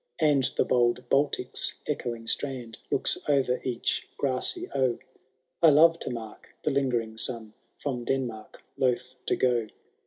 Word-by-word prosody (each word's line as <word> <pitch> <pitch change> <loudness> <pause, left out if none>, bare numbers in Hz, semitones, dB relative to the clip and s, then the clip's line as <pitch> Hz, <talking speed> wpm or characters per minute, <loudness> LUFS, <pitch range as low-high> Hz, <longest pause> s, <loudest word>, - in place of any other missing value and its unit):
And 145 -4 +3
the - - +3
bold 120 0 +2
Baltic's 135 -2 +1
echoing 120 -6 -3
strand 120 -2 -1
Looks - - +2
o'er 130 -3 +2
each 125 -3 -1
grassy 140 - 0
oe.^ 130 -3 +1 0.6
I 165 - +8
love 165 +3 +6
to - - -4
mark 115 -3 -8
the 150 - +1
lingering 120 -5 0
sun. 115 -4 -2 0.2
From 125 -4 -4
Denmark 120 -5 -3 0.2
loth 125 0 -1
to - - +2
go. 120 -3 +1
125 Hz, 135 wpm, -27 LUFS, 120-140 Hz, 0.6 s, I